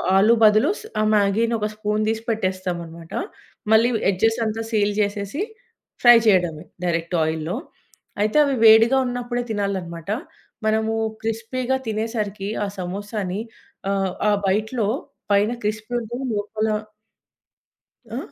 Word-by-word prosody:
ఆలు 210 +4 +6
బదులు 215 +8 +6
స్ - - -12 0.2
ఆ - - +3
మ్యాగీని 210 +3 +2
ఒక 210 - 0
స్పూన్ 210 0 -1
తీసి 225 0 -2
పెట్టేస్తాం 185 -5 -1
అన్నమాట. 165 0 -12 0.6
మళ్లీ 225 +2 +6 0.2
ఎడ్జెస్ 225 +5 +2
అంతా 220 +1 -2
సీల్ 205 -1 +2
చేసేసి, 205 - -2 0.6
ఫ్రై 240 -1 +9
చేయడమే 175 -6 +2 0.2
డైరెక్ట్ 170 0 -1
ఆయిల్‌లో. 160 +4 -2 0.7
అయితే 215 +7 +2
అవి 280 - +1
వేడిగా 225 +4 +7
ఉన్నప్పుడే 245 0 -2
తినాలి 200 -2 -1
అన్నమాట. 170 +2 -7 0.5
మనము 220 0 +1 0.3
క్రిస్పీగా 235 +4 -2
తినేసరికి 215 -2 -2 0.2
ఆ - - -3
సమోసాని 195 +1 -4 0.5
ఆహ్, 195 -2 0 0.2
ఆ - - +4 0.2
బైట్‌లో 215 +2 0 0.5
పైన 205 +3 +3
క్రిస్పీ 215 +2 -3
ఉంటుంది, 240 +4 -5
లోపల 215 +1 -2 1.4
ఆ! 235 - -4
215 Hz, 125 wpm, -22 LUFS, 195-225 Hz, 1.4 s, ఫ్రై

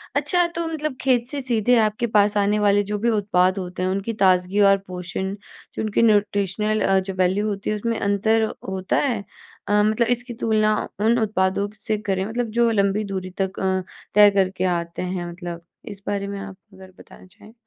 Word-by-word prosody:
अच्छा 355 -1 +2
तो 335 - -2
मतलब 305 -3 -3
खेत 245 -3 +2
से 285 - -4
सीधे 245 -2 +2
आपके 215 +2 +1
पास 205 0 +4
आने 205 +1 +2
वाले 205 0 +3
जो 210 +1 -3
भी 235 - +1
उत्पाद 195 -3 +2
होते 180 -1 -4
हैं 185 - +1
उनकी 195 +4 -2
ताज़गी 185 +1 +3
और 195 - +5
पोषण, 180 +1 -4 0.4
जो - - -4
उनकी 215 0 0
न्यूट्रिशनल 210 -1 +1
अ, 195 0 +3
जो 190 +1 -5
वैल्यू 185 +3 +1
होती 200 -1 -3
है 215 - 0
उसमें 230 +2 -2
अंतर 215 +3 +2 0.3
होता 190 -1 -1
है? 235 -8 -1 0.4
अ, 210 0 +3
मतलब 220 +2 +2
इसकी 245 0 -9
तुलना 215 -1 +2 0.2
उन 225 +3 +3
उत्पादों 200 -2 0 0.2
से 215 - 0
करें 190 0 0
मतलब 230 +2 -3
जो 235 -1 +4
लंबी 200 0 +1
दूरी 185 -1 -4
तक 190 0 -2
अ, 190 -1 0 0.3
तय 210 0 +8
करके 190 -1 0
आते 170 0 -6
हैं 180 -1 -3
मतलब 170 -1 -8 0.3
इस 195 - -21
बारे 200 -1 -2
में 200 0 -5
आप 195 -1 -8 0.2
अगर 190 0 -14
बताना - - -15
चाहें। 205 +4 -18
205 Hz, 195 wpm, -22 LUFS, 190-220 Hz, 0.4 s, तय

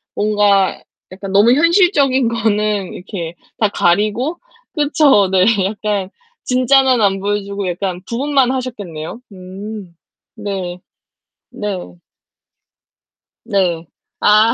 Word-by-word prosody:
뭔가 205 -2 +2 0.3
약간 195 +1 -7
너무 205 +5 +5
현실적인 295 - +3
거는 210 -3 0
이렇게 175 -3 -6 0.2
다 215 - +2
가리고 210 - +1 0.3
그쵸? 290 - +3
네. 185 -1 +4 0.2
약간 205 -1 -2 0.3
진짜는 255 0 +3
안 195 -2 +2
보여 205 +1 -1
주고 200 -1 -4
약간 180 0 -3
부분만 270 +1 +1
하셨겠네요. 215 -9 -5
음. 190 0 -9 0.4
네. 185 -3 -5 0.7
네. 190 - -5 1.5
네. 175 -4 0 0.3
아. 215 +2 +5
205 Hz, 195 characters per minute, -17 LUFS, 190-245 Hz, 1.5 s, 너무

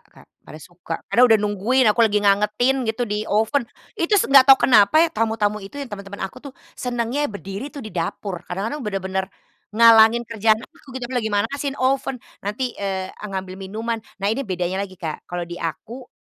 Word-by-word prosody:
Kak, - - -20
pada 155 - -13
suka, 170 +1 -8 0.2
karena 245 - +5
udah 225 - +6
nungguin 210 +5 +1
aku 235 - -1
lagi 220 -2 +4
ngangetin 210 +6 +2
gitu 240 +2 -1
di 210 0 -3
oven, 225 +4 +1 0.2
itu 340 +5 +1
s - - +3
enggak 275 -1 +6
tau 270 - +10
kenapa 245 +7 +5
ya - - +1
tamu-tamu 215 -1 0
itu 195 +8 -11
ya, 285 - -4
teman-teman 200 -3 -7
aku 225 +7 -8
tuh - - -13 0.2
senangnya 245 +4 -2
berdiri 200 +4 -7
tuh 285 -5 -9
di 215 - -9
dapur, 175 +2 -4
kadang-kadang 210 +11 -3
bener-bener 190 -3 -3 0.4
ngalangin 230 +1 +6
kerjaan 220 -1 +2
aku 275 -5 -14
gitu. 255 - -5
Aku - - -3
Lagi 220 - -2
manasiin 270 +7 -2
oven, 265 0 0 0.2
nanti, 235 +5 -3
eee, 190 -1 -3
ngambil 190 -2 -5
minuman, 225 +4 -4 0.2
nah 200 +1 0
ini 245 -1 -4
bedanya 180 +1 -2
lagi 190 -2 -6
Kak, 160 -4 -6
kalau 175 0 -4
di 175 +1 -9
aku, 230 - -6
215 Hz, 190 wpm, -22 LUFS, 195-250 Hz, 0.4 s, tau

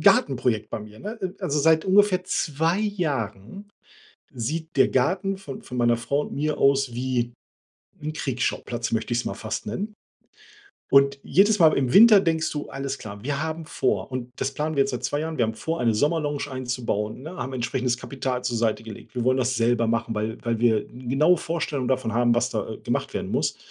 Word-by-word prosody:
Gartenprojekt 130 - +3
bei - - -3
mir, 105 0 -12
ne? 215 +3 -6
Äh 185 - 0
äh, 185 - -10
also 150 -6 0
seit 160 +2 +4
ungefähr 190 -1 +4
2 165 +1 0
Jahren 160 - -3 0.7
sieht 155 +7 -3
der 130 - +6
Garten 185 +9 +1
von 145 -9 -8
von 125 - -7
meiner 120 -1 +3
Frau 140 +5 0
und - - -6
mir 150 +1 -1
aus 135 -2 +3
wie 120 -1 -1 0.7
'n 155 +1 -4
„Kriegsschauplatz“, 125 -4 -2
möchte 115 +1 -1
ich's 120 - 0
mal - - -2
fast 110 - -4
nennen. 205 - -4 1.0
Und 140 0 +5
jedes 205 +3 +4
Mal 160 -3 +7
im 130 -2 +1
Winter 215 -1 +9
denkst 165 -3 0
du, 145 -1 -4
alles 135 0 -4
klar, 100 -1 -9
wir 140 +1 -1
haben 160 +1 -4
vor - - -1
und 125 -1 -4
das 135 - -2
planen 155 +2 -2
wir 140 - +5
jetzt 135 - -1
seit 125 - -4
2 145 - 0
Jahren, 160 -1 -4
wir 120 - +4
haben 110 0 -2
vor 165 +8 -3
eine 115 -2 +2
Sommerlounge 145 +2 0
einzubauen, 125 -4 -3
ne, 160 +5 -7
haben 130 -5 -4
entsprechendes 125 0 -1
Kapital 130 -1 -4
zur 120 -2 -1
Seite 110 -1 0
gelegt. 110 +2 -11
Wir 120 -2 -1
wollen 130 +1 +3
das 130 0 +1
selber 115 0 +2
machen, 115 0 -1
weil 110 +2 -2
weil 115 -1 0
wir 115 -3 +3
'n 125 0 -10
genaue 155 +8 +4
Vorstellung 150 -6 -2
davon 130 -3 0
haben, 120 0 +3
was 120 +1 +1
da, - - -3
äh, - - -8
gemacht - - -2
werden - - -3
muss. - - 0
135 Hz, 205 wpm, -25 LUFS, 120-160 Hz, 1.0 s, Winter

